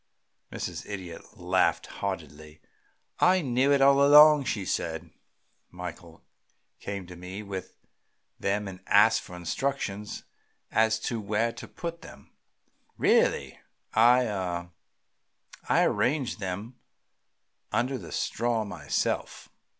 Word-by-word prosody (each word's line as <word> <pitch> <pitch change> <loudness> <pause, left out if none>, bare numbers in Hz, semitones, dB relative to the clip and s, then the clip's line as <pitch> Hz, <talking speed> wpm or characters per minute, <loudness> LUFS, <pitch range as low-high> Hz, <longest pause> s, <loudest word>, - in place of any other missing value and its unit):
Mrs. - - -5
Idiot 90 -5 -8
laughed - - +1
heartily. 75 -5 -6 0.6
"I 185 +1 +4
knew 130 +1 +2
it 140 -1 +4
all 140 0 +6
along," 150 0 +8
she 105 -5 -2
said. 80 -1 -3 0.6
"Michael 90 -2 -9 0.6
came 100 -2 -5
to 90 0 -11
me 90 +4 -8
with 95 -2 -7 0.6
them 100 +1 -1
and 95 -1 -8
asked - - +5
for 90 - -11
instructions 105 - -3 0.5
as 110 0 +3
to 115 -1 -3
where 110 +3 0
to 115 - -9
put 170 -1 -6
them. - - -14 0.7
Really, - - +2 0.3
I 120 +3 +5
ah 90 -4 -3 1.0
I - - +4
arranged 135 -2 0
them 100 +5 -5 0.9
under 130 +2 0
the - - -10
straw 115 -1 -1
myself." 85 -8 -3
105 Hz, 110 wpm, -27 LUFS, 90-125 Hz, 1.0 s, along